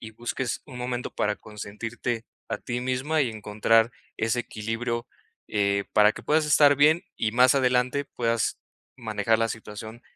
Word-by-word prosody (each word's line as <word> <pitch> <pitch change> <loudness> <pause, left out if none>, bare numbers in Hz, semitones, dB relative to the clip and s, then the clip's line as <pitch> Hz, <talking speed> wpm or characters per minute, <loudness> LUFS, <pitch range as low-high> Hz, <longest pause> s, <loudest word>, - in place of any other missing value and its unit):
y 110 -1 -9
busques 120 +2 -3
un 130 -4 -9
momento 125 0 -3
para 105 0 0
consentirte 115 +2 -5 0.2
a 115 - -1
ti 120 0 -4
misma 130 +5 0
y 130 - 0
encontrar 110 +2 +2 0.2
ese 115 +2 0
equilibrio, 115 +1 -3 0.4
eh, 100 -1 +1
para 105 0 +6
que - - -10
puedas 155 0 +2
estar 145 -1 +6
bien 155 +4 +4
y 110 - 0
más 125 +3 +5
adelante 125 +1 +2
puedas 115 -3 -1 0.4
manejar 110 -2 0
la 115 0 +1
situación 110 +2 -8
115 Hz, 155 wpm, -26 LUFS, 110-125 Hz, 0.4 s, para